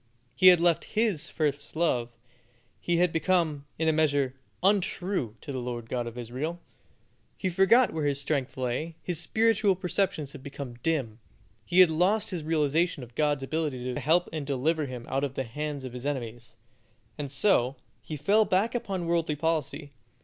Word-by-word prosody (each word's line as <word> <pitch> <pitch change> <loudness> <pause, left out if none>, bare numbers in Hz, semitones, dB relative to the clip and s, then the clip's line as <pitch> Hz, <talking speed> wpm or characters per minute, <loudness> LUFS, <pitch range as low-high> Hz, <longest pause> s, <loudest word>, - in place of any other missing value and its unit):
He 185 - +5
had 180 -2 +9
left 170 +2 +1
His 215 -9 +1
first 145 -2 -2
love; 125 -8 +1 0.7
he 175 -1 0
had 175 -1 +2
become, 165 -3 +1
in 160 - 0
a 160 - +4
measure, 145 -4 +2 0.3
untrue 185 - 0
to - - -7
the 130 - -3
Lord 120 -2 -5
God 120 -1 -1
of 120 +1 -8
Israel. 130 +9 -4 0.8
He 185 - -1
forgot 215 +7 +4
where 155 -2 -1
his 140 -1 +1
strength 140 -2 -2
lay; 130 +6 -2
his 175 -3 -1
spiritual 215 +2 +2
perceptions 180 -5 -1
had 140 - -10
become 140 -2 -7
dim; 130 -9 -1 0.4
he 180 +7 +5
had 180 -3 +6
lost 200 +7 +1
his 175 -4 -3
realization 155 0 +1
of 120 -1 -12
God's 145 0 +1
ability 135 -4 -2
to - - -3
help 170 +4 +2
and 155 -2 -3
deliver 145 +3 0
him 125 -2 -7
out 135 +1 -1
of 135 -2 -2
the 135 - -1
hands 145 +3 -5
of 125 - -7
his 125 +2 -5
enemies, 120 -5 -5 0.6
and 145 -2 -3
so 135 -3 +2 0.3
he 155 - -6
fell 205 +10 +4
back 205 +3 +1
upon 195 -7 -3
worldly 165 -2 0
policy. 155 -2 -2
155 Hz, 175 wpm, -28 LUFS, 135-175 Hz, 0.8 s, had